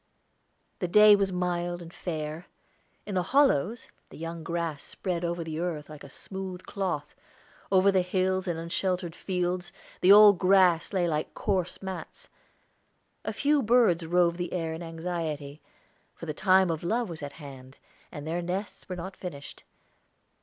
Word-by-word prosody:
The 180 - -1
day 210 +3 +8
was 195 -1 0
mild 175 -1 -1
and 170 0 -11
fair; 155 0 -5 0.6
in 205 - -5
the 185 - +2
hollows, 230 - +2 0.2
the - - -12
young 165 +1 -6
grass 165 -3 -3
spread 180 -3 -4
over 170 0 -2
the 160 -1 -5
earth 160 -4 -3
like 150 - -10
a 140 - -11
smooth 190 +2 -7
cloth; 175 -7 -3 0.6
over 190 +1 +5
the 190 -1 +3
hills 185 +1 0
and 170 -2 -1
unsheltered 175 +1 -2
fields, 180 -1 -2 0.3
the 185 - +5
old 205 -2 +9
grass 185 -3 +4
lay 185 -3 +1
like 155 -2 -2
coarse 190 -3 -2
mats. 190 - -7 0.9
A - - -2
few 290 0 +2
birds 225 -8 +4
roved 170 +1 +2
the 175 -1 -4
air 165 -3 -2
in 160 - -6
anxiety, 160 -3 -4 0.5
for - - -9
the 155 - -3
time 190 +1 +4
of 160 0 -4
love 230 +6 0
was 165 -3 -7
at 145 -1 -6
hand, 135 -3 -11 0.3
and 145 -1 -7
their 165 +2 -2
nests 185 +4 -5
were 180 - -3
not 185 +2 -7
finished. 145 -6 -8
175 Hz, 160 wpm, -28 LUFS, 165-190 Hz, 0.9 s, old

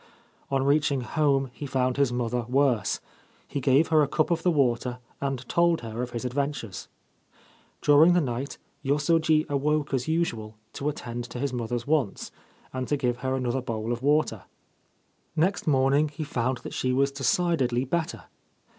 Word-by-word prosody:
On 135 -1 +1
reaching 140 -1 +2
home 135 -1 +1
he 145 +3 -6
found 130 -1 0
his 140 -3 +2
mother 120 0 -1
worse. 130 -4 +2 0.5
He 140 - -3
gave 135 +5 +3
her 155 -1 +5
a 145 - +3
cup 155 +3 0
of 165 -1 +1
the 180 - +2
water, 125 -5 +1 0.2
and 135 -3 -3
told 170 -1 +2
her 115 0 -5
of 125 - -3
his 120 0 -5
adventures. 130 -5 -3 1.0
During 150 +4 +6
the 175 - +4
night 135 -2 -3 0.3
Yosoji 155 +2 +2
awoke 145 +1 0
as 130 0 0
usual 115 -10 -1 0.2
to 145 - -2
attend 120 -4 -5
to 120 - -8
his 140 0 -2
mother's 120 0 -3
wants, 145 -9 0 0.4
and 130 0 -3
to 145 - +1
give 125 -3 0
her 130 +1 -1
another 130 0 -1
bowl 115 -1 -3
of 120 - -5
water. 150 +3 +1 0.9
Next 185 +4 +1
morning 140 +1 +3
he 155 +2 -5
found 130 -3 -1
that - - -7
she 130 - 0
was 140 +2 +2
decidedly 135 -2 +1
better. 165 +4 -2
135 Hz, 165 wpm, -26 LUFS, 125-150 Hz, 1.0 s, During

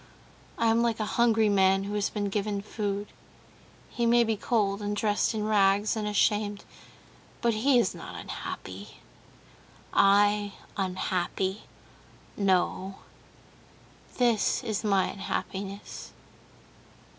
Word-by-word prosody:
"I 230 - 0
am 230 +1 +3
like 230 -2 0
a 215 - 0
hungry 225 0 +3
man 195 -1 +3
who 200 +1 -5
has 205 -1 0
been 205 -1 -2
given 200 0 -2
food. 205 -1 -3 0.8
He 235 -1 -1
may 235 0 +5
be 225 -1 0
cold, 205 -2 0
and 205 0 -2
dressed 210 +1 +1
in 210 -1 -1
rags, 205 0 +3
and 215 -1 -2
ashamed, 205 0 +1 0.7
but 235 -1 +1
he 250 +5 +3
is 240 - +2
not - - -9
unhappy. - - -7 1.0
I 205 0 +4 0.2
unhappy? 190 +1 -2 0.7
No, 190 0 0 1.2
this 240 -4 +2
is 220 0 -2
my 195 -3 +3
unhappiness...." 195 0 -5
205 Hz, 115 wpm, -28 LUFS, 195-220 Hz, 1.2 s, may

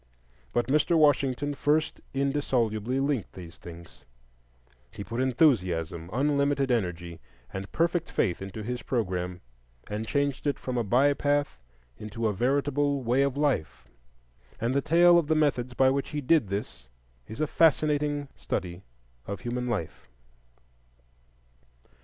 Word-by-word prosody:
But 120 -1 +1
Mr. 155 +6 +2
Washington 145 -2 +2
first 150 +3 0
indissolubly 130 -4 0
linked 135 -5 -1
these 85 -2 -11
things; 85 -1 -12 0.9
he 100 - -8
put 115 +4 -3
enthusiasm, 90 - +1
unlimited 140 +1 +1
energy, 90 -7 -2 0.3
and 95 +1 -6
perfect 170 0 0
faith 90 -5 0
into 95 +3 -6
his 125 +3 -4
programme, 90 -7 -2 0.5
and 105 +2 -4
changed 140 0 -1
it 145 - 0
from 130 - -5
a 120 - +1
by 130 +7 +3
path 145 - 0 0.4
into 110 +2 -5
a 105 - 0
veritable 140 +4 0
Way 125 +3 +2
of 140 0 0
Life. 80 - -1 0.7
And 115 +3 0
the 140 - +2
tale 170 +3 +6
of 160 - -2
the 160 - +2
methods 130 -5 0
by 130 0 +4
which 140 0 -2
he 150 - -3
did 145 -3 +3
this 100 - -5 0.4
is 110 - -9
a 155 - +2
fascinating 150 -2 +2
study 90 0 -4 0.5
of 100 -2 -5
human 125 +1 -3
life. 80 - -4
130 Hz, 135 wpm, -27 LUFS, 100-145 Hz, 0.9 s, tale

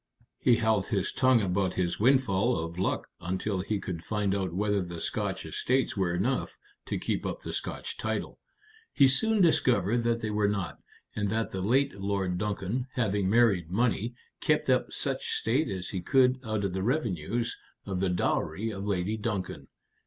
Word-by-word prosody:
He 120 - +5
held 110 -4 +1
his 100 -3 0
tongue 130 -3 +4
about 95 -1 0
his 90 -2 -1
windfall 120 -3 +3
of 85 +2 -4
luck 95 - 0
until 95 +3 -2
he 105 +2 -2
could 90 -3 -5
find 105 -2 0
out 95 -3 -1
whether 100 +2 +1
the 85 -2 -6
Scotch - - -2
estates 130 +1 0
were 95 -3 +1
enough 125 +9 -1 0.3
to - - -1
keep - - -2
up - - -4
the - - -6
Scotch - - -4
title. - - -3 0.5
He 140 - +6
soon 215 +10 +3
discovered 120 - +3
that 115 0 0
they 110 - -2
were 105 -1 +2
not, 100 -3 -2 0.4
and 105 -1 0
that 110 +2 -1
the 95 - -3
late 135 +8 +2
Lord 95 -3 -1
Duncan, 105 +5 -2
having 100 -5 +1
married 100 -7 +3
money, 115 +3 0 0.2
kept - - +2
up - - +1
such - - -2
state 130 +8 +1
as 95 -2 -4
he 95 - -3
could 130 +5 +3
out 110 -3 -2
of 95 -2 -1
the 95 - -2
revenues 115 - -1 0.3
of 95 -2 -3
the 95 0 +1
dowry 100 +4 0
of 100 0 -5
Lady 100 +2 0
Duncan. 105 -3 -3
105 Hz, 175 wpm, -29 LUFS, 95-120 Hz, 0.5 s, He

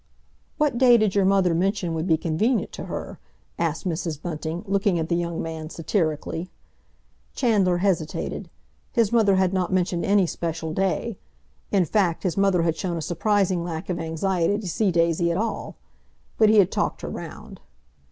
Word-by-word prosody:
"What 290 -6 +1
day 245 -2 +7
did 215 -3 +1
your 200 -2 +3
mother 190 -3 +3
mention 185 0 0
would 160 +2 -2
be 160 -3 +4
convenient 185 +8 0
to - - -7
her?" - - -6 0.4
asked 165 +2 -1
Mrs. 165 -3 -3
Bunting, 160 +1 -4
looking 195 -2 +1
at 160 -1 -2
the 170 - +2
young 170 -1 -2
man 160 -1 -5
satirically. 165 0 -2 0.9
Chandler 200 -8 +2
hesitated. 175 -4 -1 0.4
His 230 -5 +2
mother 220 -4 +4
had 190 0 +2
not 185 -2 0
mentioned 180 -2 0
any 200 -1 +3
special 165 -1 -4
day—in 195 +1 -2
fact, 180 -2 +1
his 180 -4 0
mother 195 -3 +3
had 165 -1 +1
shown 170 +1 -3
a - - -2
surprising 185 +1 +1
lack 170 +1 -4
of 170 - -3
anxiety 170 +3 0
to 210 -3 -6
see 195 +3 +1
Daisy 170 0 +2
at 170 - 0
all. 225 +2 -3 0.6
But 220 -1 +6
he 215 - +5
had 195 -3 +5
talked - - -1
her - - -5
round. - - -8
180 Hz, 170 wpm, -24 LUFS, 165-200 Hz, 0.9 s, day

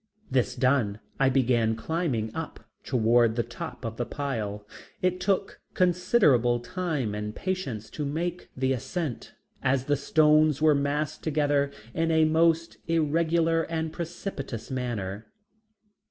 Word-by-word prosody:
This 125 -1 +1
done 125 -5 +2 0.2
I 135 -1 +4
began 120 -4 +2
climbing 125 -6 -2
up 160 -1 -6 0.2
toward 115 -2 +3
the 120 - +1
top 120 +1 -7
of 115 0 -5
the 120 - -1
pile. 110 -8 -3 0.3
It 185 0 0
took 195 +1 -1
considerable 175 - +3
time 130 - -2
and 105 0 -4
patience 180 - -3
to 150 - -4
make 170 +5 -3
the 130 0 +1
ascent, 145 +2 -4 0.3
as 130 0 +1
the 145 - +2
stones 155 +1 +4
were 155 0 +5
massed 145 +2 -1
together 145 -2 +1 0.2
in 165 +1 0
a 160 -1 +4
most 165 +1 +2
irregular 165 +1 +2
and 160 -1 -2
precipitous 160 - -5
manner. 110 -6 -3
140 Hz, 130 wpm, -27 LUFS, 120-165 Hz, 0.3 s, were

